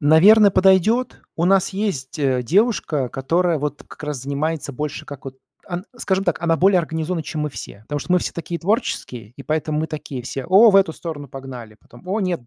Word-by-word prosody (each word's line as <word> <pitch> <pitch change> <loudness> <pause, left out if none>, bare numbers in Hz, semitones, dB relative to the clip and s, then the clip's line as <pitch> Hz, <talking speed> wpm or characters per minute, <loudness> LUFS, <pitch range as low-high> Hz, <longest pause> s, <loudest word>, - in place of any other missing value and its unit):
Наверно, 195 +8 +6
подойдет. 195 +6 +3
У 170 - 0
нас 190 0 +3
есть, 190 -9 -3
э, 130 -3 +1
девушка, 165 - +1
которая 165 +6 0
вот 145 0 -4
как 150 - -13
раз 145 -4 -4
занимается 145 +1 -3
больше 150 +2 -5
как 140 -2 -10
вот 130 0 -9 0.3
ан 180 +1 -5
скажем 195 -3 0
так, 175 -4 0
она 165 -1 +2
более 190 +1 +4
организована, 160 +1 -2
чем 150 0 -4
мы 150 - -2
все. 100 - -9
Потому 145 +5 -4
что 180 - -3
мы 180 - +5
все - - -3
такие 170 0 -5
творческие, 175 - -2
и 140 - -9
поэтому 155 0 -1
мы 160 - -1
такие 150 -5 -6
все: 130 +2 -5
"О, 210 +5 +7
в 195 - +5
эту 190 -5 +4
сторону 145 -5 -7
погнали". 125 -5 -9
Потом: 120 +9 -17
"О 210 +3 0
нет, 180 -6 -1
160 Hz, 205 wpm, -21 LUFS, 140-185 Hz, 0.3 s, О